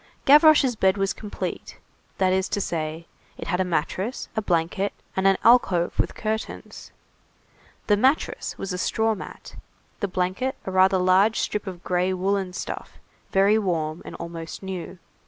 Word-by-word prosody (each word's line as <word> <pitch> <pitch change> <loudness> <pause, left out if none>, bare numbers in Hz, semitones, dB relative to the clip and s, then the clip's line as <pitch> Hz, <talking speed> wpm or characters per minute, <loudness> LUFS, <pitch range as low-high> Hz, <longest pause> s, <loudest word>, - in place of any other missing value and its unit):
Gavroche's 295 -3 +6
bed 190 -1 +2
was 195 0 0
complete; 210 -2 -6 0.4
that 185 -1 +2
is 190 0 0
to - - -1
say, 160 -3 -3 0.3
it - - -7
had 180 - 0
a - - +3
mattress, 185 - -2
a 220 - 0
blanket, 180 +1 0 0.2
and 190 0 +2
an 195 -1 +4
alcove 195 -7 +4
with - - 0
curtains. 220 0 -5 0.9
The 210 - +4
mattress 265 +8 0
was 195 -1 -4
a 180 - -3
straw 220 +3 +1
mat, 195 - -10 0.4
the 200 - -1
blanket 185 +9 -1
a 190 - -3
rather 190 +1 +4
large 185 +4 +3
strip 210 -1 -2
of 180 -2 -7
gray 180 +1 0
woollen 190 0 -1
stuff, - - -6 0.4
very 200 +3 +4
warm 165 -5 -2
and - - -9
almost 170 +1 -7
new. 185 -1 -6
190 Hz, 155 wpm, -24 LUFS, 180-210 Hz, 0.9 s, Gavroche's